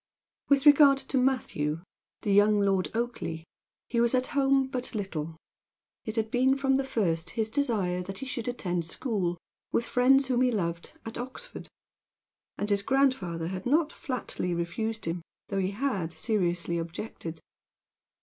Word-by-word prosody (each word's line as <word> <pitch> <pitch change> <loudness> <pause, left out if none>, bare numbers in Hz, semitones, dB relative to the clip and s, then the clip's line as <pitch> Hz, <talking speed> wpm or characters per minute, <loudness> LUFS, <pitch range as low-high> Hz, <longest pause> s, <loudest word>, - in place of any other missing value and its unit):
With 280 0 +4
regard 290 -1 +8
to 275 - -2
Matthew, 165 - 0 0.4
the 205 - +1
young 205 +1 +5
Lord 195 -2 +2
Oakleigh, 230 -9 -3 0.4
he 235 -1 +1
was 235 +2 +3
at 255 0 +2
home 270 -1 +3
but 255 -2 -4
little. 165 -6 -4 0.7
It 220 - -3
had 220 -1 0
been 260 +2 +3
from 270 -1 +2
the 275 - 0
first 185 -11 -1
his 220 -1 0
desire 210 -10 0
that 190 +2 -6
he 270 - -5
should 245 -3 -4
attend 180 -8 -1
school, 185 - -1 0.3
with 230 - +1
friends 270 +3 +4
whom 255 -1 +1
he 255 - +4
loved, 170 -6 -2
at 225 +1 -6
Oxford; 260 - -8 0.9
and 205 - -2
his 200 -1 +2
grandfather 200 -11 +1
had 185 +3 -4
not 300 +3 +3
flatly 250 - -3
refused 215 +7 -3
him, 165 +1 -2 0.3
though 195 - -1
he 185 -1 +1
had 200 -7 -2
seriously 175 -2 0
objected. 165 -1 -6
220 Hz, 155 wpm, -28 LUFS, 180-260 Hz, 0.9 s, regard